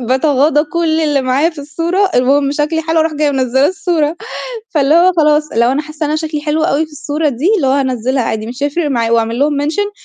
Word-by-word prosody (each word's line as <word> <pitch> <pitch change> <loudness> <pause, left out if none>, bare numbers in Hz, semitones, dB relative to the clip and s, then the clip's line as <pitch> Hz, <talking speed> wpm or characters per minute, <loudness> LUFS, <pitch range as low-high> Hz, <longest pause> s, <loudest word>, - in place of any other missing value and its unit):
باتغاضى 280 +4 +2
كلّ 325 0 -1
اللي 295 -3 +1
معايا 270 +6 +1
في 320 - -15
الصورة، 340 +7 -1
المهم 275 +3 +2
شكلي 305 +2 -1
حلو 325 0 +1
اروح 315 -1 0
جاية 295 0 +1
منزّلة 265 0 +1
الصورة. 345 -5 -1 0.5
فاللي 295 -1 +2
هو 355 +2 +5
خلاص 300 -1 +3
لو 235 +2 +2
أنا 290 +3 0
حاسة 305 +1 -7
إن - - -2
أنا 305 - 0
شكلي 310 -1 -3
حلو 310 +1 -1
أوي 315 -1 +1
في 310 - -21
الصورة 295 +1 -2
دي، 275 +6 -2
اللي 275 -9 0
هو - - +3
هانزّلها 260 -2 0
عادي 220 -1 -3
مش 250 +4 -6
هيفرق 295 +2 -1
معايا، 230 -4 0
وأعمل 230 +1 0
لهم 285 0 +1
mention 405 +8 -1
295 Hz, 220 wpm, -14 LUFS, 265-320 Hz, 0.5 s, هو